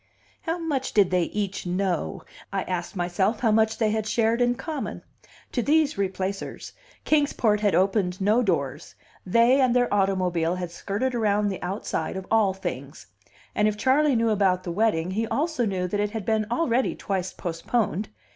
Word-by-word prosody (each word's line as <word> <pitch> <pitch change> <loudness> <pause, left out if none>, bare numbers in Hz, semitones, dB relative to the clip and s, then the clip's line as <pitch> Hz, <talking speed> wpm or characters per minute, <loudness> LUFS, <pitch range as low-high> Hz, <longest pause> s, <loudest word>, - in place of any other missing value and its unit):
How 330 +1 -2
much 290 -6 -2
did 195 -4 +4
they 180 -2 +2
each 200 -2 -3
know? 180 -1 -1 0.3
I 195 -1 -1
asked 180 +1 -4
myself 190 +5 0
how 225 -3 +3
much 220 0 +2
they 220 -2 +1
had 215 -1 -1
shared 230 +2 +1
in 245 0 +3
common. 305 +1 -5 0.5
To 245 - 0
these 300 +3 +2
Replacers 195 0 -3 0.3
Kings 295 -2 +2
Port 210 -3 +2
had 205 -4 +2
opened 185 0 +1
no 210 +5 +3
doors; 150 - -2 0.3
they 235 +7 +4
and 250 -2 +3
their 245 -3 +2
automobile 180 -4 +1
had 180 -2 -5
skirted 205 +8 -2
around 210 -3 +1
the 190 - -5
outside 185 -2 -3
of 190 - -6
all 220 -3 +4
things. 190 - -6 0.5
And 210 - +2
if 210 -1 -1
Charley 270 +4 +3
knew 230 -1 +2
about 190 -3 +2
the 175 - -4
wedding, 180 -3 +1
he 220 +4 -1
also 290 -2 0
knew 185 -2 -1
that 205 - -1
it 210 0 +1
had 215 -2 -5
been 220 -1 +1
already 250 0 +1
twice 190 -2 -3
postponed. 185 +4 -2
210 Hz, 175 wpm, -25 LUFS, 185-235 Hz, 0.5 s, did